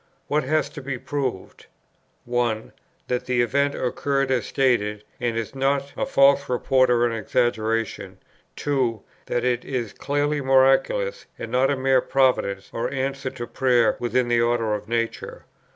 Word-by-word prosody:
What 150 Hz, +1 st, +1 dB
has 155 Hz, +3 st, +1 dB
to -, -, -9 dB
be 135 Hz, -1 st, -4 dB
proved? 130 Hz, -7 st, -4 dB, 0.6 s
(1.) 120 Hz, -2 st, -1 dB, 0.4 s
That 125 Hz, 0 st, -2 dB
the 125 Hz, -1 st, +2 dB
event 140 Hz, +4 st, +1 dB
occurred 135 Hz, +2 st, -1 dB
as 125 Hz, -4 st, 0 dB
stated, 105 Hz, -6 st, +1 dB, 0.2 s
and 120 Hz, -2 st, -1 dB
is 115 Hz, +2 st, -4 dB
not 135 Hz, +1 st, 0 dB
a -, -, -2 dB
false 140 Hz, +1 st, +4 dB
report 130 Hz, +1 st, +2 dB
or 120 Hz, -1 st, +3 dB
an 120 Hz, -, 0 dB
exaggeration. 115 Hz, -1 st, -1 dB, 0.4 s
(2.) 130 Hz, -7 st, -1 dB, 0.2 s
That 120 Hz, -, -1 dB
it 125 Hz, -1 st, 0 dB
is 125 Hz, -5 st, -4 dB
clearly 145 Hz, +1 st, -1 dB
miraculous, 135 Hz, -, +2 dB
and -, -, -7 dB
not 130 Hz, +2 st, +3 dB
a 140 Hz, -, 0 dB
mere 130 Hz, -1 st, +3 dB
providence 110 Hz, -8 st, +1 dB
or 115 Hz, -, -2 dB
answer 135 Hz, 0 st, -2 dB
to 130 Hz, -2 st, -7 dB
prayer 125 Hz, -2 st, +2 dB
within 120 Hz, +1 st, 0 dB
the 120 Hz, -1 st, +2 dB
order 115 Hz, -2 st, +1 dB
of 105 Hz, 0 st, -4 dB
nature. 115 Hz, 0 st, -3 dB
125 Hz, 155 wpm, -23 LUFS, 120-135 Hz, 0.6 s, false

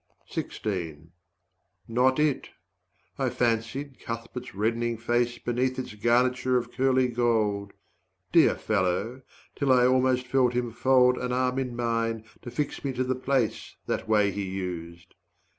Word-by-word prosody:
90 80 Hz, -6 st, -4 dB, 0.8 s
Not 125 Hz, +3 st, +3 dB
it! 150 Hz, -2 st, +1 dB, 0.7 s
I -, -, +1 dB
fancied 120 Hz, +4 st, -1 dB
Cuthbert's 115 Hz, 0 st, -6 dB
reddening 115 Hz, +3 st, 0 dB
face 120 Hz, +1 st, 0 dB
Beneath 125 Hz, +2 st, -1 dB
its 130 Hz, -4 st, -5 dB
garniture 125 Hz, +3 st, +2 dB
of 120 Hz, -, -3 dB
curly 130 Hz, -1 st, +2 dB
gold, 110 Hz, -4 st, 0 dB, 0.6 s
Dear -, -, +5 dB
fellow, 105 Hz, +5 st, -1 dB, 0.3 s
till 140 Hz, -2 st, +1 dB
I 125 Hz, -1 st, +5 dB
almost 130 Hz, 0 st, +3 dB
felt 125 Hz, -1 st, +2 dB
him 120 Hz, -1 st, -1 dB
fold 125 Hz, +1 st, +4 dB
An 125 Hz, 0 st, -2 dB
arm 125 Hz, +1 st, +1 dB
in 125 Hz, -2 st, -3 dB
mine 115 Hz, -2 st, -1 dB, 0.2 s
to 120 Hz, -, -7 dB
fix 145 Hz, +4 st, -3 dB
me 135 Hz, -2 st, -2 dB
to 130 Hz, +1 st, 0 dB
the 130 Hz, 0 st, 0 dB
place, 130 Hz, -2 st, -1 dB
That -, -, -2 dB
way 105 Hz, -2 st, +3 dB
he 100 Hz, +2 st, -4 dB
used. 85 Hz, -3 st, -6 dB
120 Hz, 140 wpm, -27 LUFS, 110-130 Hz, 0.8 s, Dear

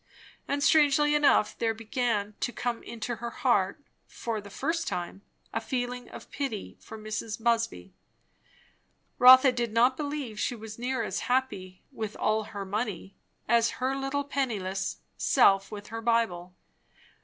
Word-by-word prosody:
And 285 Hz, 0 st, -1 dB
strangely 295 Hz, -1 st, +4 dB
enough, 290 Hz, -7 st, +3 dB
there 225 Hz, -1 st, 0 dB
began 220 Hz, -2 st, -1 dB
to 245 Hz, -, -1 dB
come 240 Hz, 0 st, -3 dB
into 235 Hz, +1 st, -5 dB
her 235 Hz, +1 st, -5 dB
heart, 235 Hz, -4 st, +1 dB, 0.3 s
for 225 Hz, -3 st, -4 dB
the 200 Hz, -, -12 dB
first 325 Hz, -, -2 dB
time, 175 Hz, +2 st, -4 dB, 0.3 s
a -, -, -1 dB
feeling 245 Hz, -1 st, -3 dB
of -, -, -11 dB
pity 270 Hz, -8 st, -4 dB
for 220 Hz, -, -10 dB
Mrs. 215 Hz, 0 st, -5 dB
Busby. 225 Hz, -, -1 dB, 1.3 s
Rotha 255 Hz, +1 st, +9 dB
did 240 Hz, -2 st, -2 dB
not 245 Hz, +3 st, +3 dB
believe 285 Hz, -7 st, -4 dB
she 245 Hz, -, -1 dB
was 220 Hz, 0 st, -9 dB
near 250 Hz, 0 st, -1 dB
as 200 Hz, -2 st, -3 dB
happy, 200 Hz, -8 st, -1 dB
with 220 Hz, -5 st, -5 dB
all 215 Hz, 0 st, +1 dB
her 200 Hz, -1 st, -6 dB
money, 200 Hz, -2 st, -4 dB, 0.3 s
as 235 Hz, 0 st, +3 dB
her 260 Hz, +1 st, -1 dB
little 275 Hz, +1 st, -2 dB
penniless 205 Hz, -9 st, -2 dB, 0.2 s
self 195 Hz, 0 st, +4 dB
with 205 Hz, -1 st, -8 dB
her 225 Hz, +1 st, -5 dB
Bible. 220 Hz, -7 st, 0 dB
230 Hz, 145 wpm, -28 LUFS, 210-260 Hz, 1.3 s, Rotha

